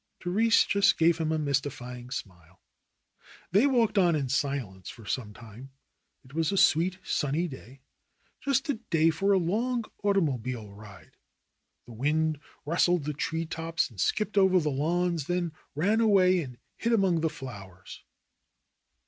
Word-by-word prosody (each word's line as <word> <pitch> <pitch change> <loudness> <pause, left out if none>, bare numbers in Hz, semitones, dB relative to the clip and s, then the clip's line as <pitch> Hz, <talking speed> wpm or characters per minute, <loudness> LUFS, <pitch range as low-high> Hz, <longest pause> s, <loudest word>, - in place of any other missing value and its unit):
Therese 220 +6 +3
just 200 0 +3
gave 165 0 +3
him 160 -1 0
a 160 - +1
mystifying 130 -4 -3
smile. 90 - -8 0.9
They 205 +10 +4
walked 230 -6 +2
on 175 -3 +4
in 140 -4 -2
silence 135 - -2
for 115 -1 -12
some 110 0 -3
time. 115 +4 -12 0.6
It 130 - -17
was 160 +1 0
a 195 - -1
sweet, 180 +2 +3
sunny 150 +5 -1
day, 130 -2 -12 0.6
just 275 +1 0
a 260 -6 -1
day 165 -1 +3
for 195 +6 0
a 195 - +5
long 225 +7 -1 0.2
automobile 130 - -1
ride. 100 -3 -14 0.7
The 120 - -12
wind 150 +5 0 0.3
rustled 175 +1 +2
the 150 +1 -3
tree 165 +3 -2
tops 165 -2 -2
and 100 -5 -6
skipped 210 -1 +1
over 190 -1 +5
the 150 -3 -1
lawns, 170 +2 0
then 175 -1 -1 0.2
ran 205 +9 +2
away 185 -4 +4
and 125 -5 -8 0.2
hid 230 0 0
among 190 -6 +2
the 160 - +1
flowers. 100 - -10
160 Hz, 150 wpm, -28 LUFS, 130-185 Hz, 0.9 s, a